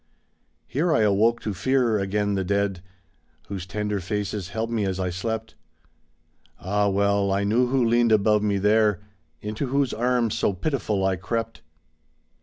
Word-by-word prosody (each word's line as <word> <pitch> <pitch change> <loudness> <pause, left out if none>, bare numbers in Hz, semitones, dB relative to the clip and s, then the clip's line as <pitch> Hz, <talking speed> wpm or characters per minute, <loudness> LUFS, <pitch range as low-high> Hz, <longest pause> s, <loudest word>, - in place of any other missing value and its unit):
Here 160 - 0
I 150 - +3
awoke 110 +3 +3
to 105 - -3
fear 120 +2 +1
again 100 +1 0
the 95 -1 0
dead, 100 -1 -1 0.7
Whose 95 -2 -5
tender 105 +2 -2
faces 100 0 -3
held 115 +2 -3
me 110 -3 0
as 95 -1 -2
I 90 -1 -1
slept. 110 +5 -4 1.1
Ah, 100 +2 0
well 100 0 +1
I 100 +1 +1
knew 115 +5 +2
who 130 -1 +2
leaned 120 0 +3
above 105 0 +4
me 105 -1 +1
there. 105 0 +2 0.4
Into 105 +6 -3
whose 135 0 0
arms 120 -1 +1
so 100 - +1
pitiful 105 - -1
I 95 -1 +1
crept. 115 +5 -4
105 Hz, 155 wpm, -24 LUFS, 100-115 Hz, 1.1 s, above